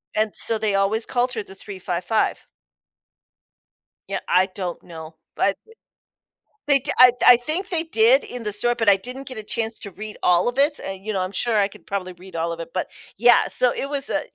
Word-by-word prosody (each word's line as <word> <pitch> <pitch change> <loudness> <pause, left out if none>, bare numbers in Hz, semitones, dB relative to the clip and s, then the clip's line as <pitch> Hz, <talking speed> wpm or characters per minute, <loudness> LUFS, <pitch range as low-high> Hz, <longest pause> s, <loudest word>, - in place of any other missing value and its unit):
And 215 -1 +1
so, 225 - -1
they 215 -2 0
always 195 +3 +1
called 250 0 0
her 220 -4 -3
The 190 - -14
355. 185 +1 -2 1.6
Yeah, - - -2
I 185 +1 +3
don't 185 -2 -5
know, 160 -2 -10 0.2
but 200 - +1
i 450 - -17 0.9
they 280 -1 +5
di - - -3
I 250 0 +9 0.2
I 245 - +10
think 310 +10 -3
they 335 -3 -1
did 450 +9 +4
in 245 -1 -7
the 210 -1 -3
store, 240 +4 +1
but 225 -3 -2
I 200 - +7
didn't 250 +7 -7
get 255 - -7
a 215 - -6
chance 225 +1 -2
to 200 - -9
read 215 +3 -8
all 175 +2 +4
of 245 +1 -2
it, 290 +2 +2
and, 195 0 -7
you 215 - -2
know- 195 - -1
I'm 185 +1 -3
sure 230 +3 0
I 200 -1 +3
could 200 - -17
probably 185 -2 -4
read 185 +1 -14
all 165 +1 -1
of 170 - -7
it- 165 - -8
but 185 - -2 0.3
yeah, 240 +3 +5
so 250 -1 +2
it 275 - -4
was 280 -1 -2
a - - 0
215 Hz, 220 wpm, -22 LUFS, 190-250 Hz, 1.6 s, I